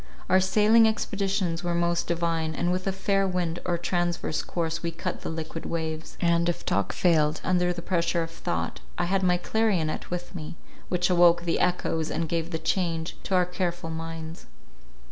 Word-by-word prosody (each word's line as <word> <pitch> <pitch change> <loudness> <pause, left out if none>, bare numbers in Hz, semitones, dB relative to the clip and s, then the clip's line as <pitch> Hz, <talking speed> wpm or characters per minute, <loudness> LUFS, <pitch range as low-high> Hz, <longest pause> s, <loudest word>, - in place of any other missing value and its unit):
Our 185 - +7
sailing 215 +4 +5
expeditions 195 -5 -1
were 175 -1 0
most 170 0 +1
divine, 165 -2 0
and 175 0 0
with 185 +1 -1
a - - +2
fair 195 +1 +1
wind 175 -2 -1
or 175 -1 +1
transverse 175 -2 -1
course 165 -1 -2
we 170 - -1
cut 165 - -4
the - - -4
liquid 160 0 -5
waves; 160 -1 -4
and, 170 0 +2
if 175 - -3
talk 100 - +1
failed 155 -3 +2
under 180 -1 +2
the 170 -1 -5
pressure 170 -2 +1
of 165 - -7
thought, 175 +1 -3 0.2
I 175 - +1
had 190 +2 +1
my 180 -1 +3
clarionet 185 -5 0
with 175 +1 -5
me, 155 -3 -6 0.3
which 180 0 +1
awoke 175 -1 +5
the 170 - 0
echoes, 165 -3 0
and 165 +1 -1
gave 165 0 -1
the 165 - -2
change 165 -1 -1
to 190 - +1
our 180 -1 +4
careful 175 -2 -3
minds. 165 0 -6
175 Hz, 185 wpm, -27 LUFS, 165-180 Hz, 0.3 s, Our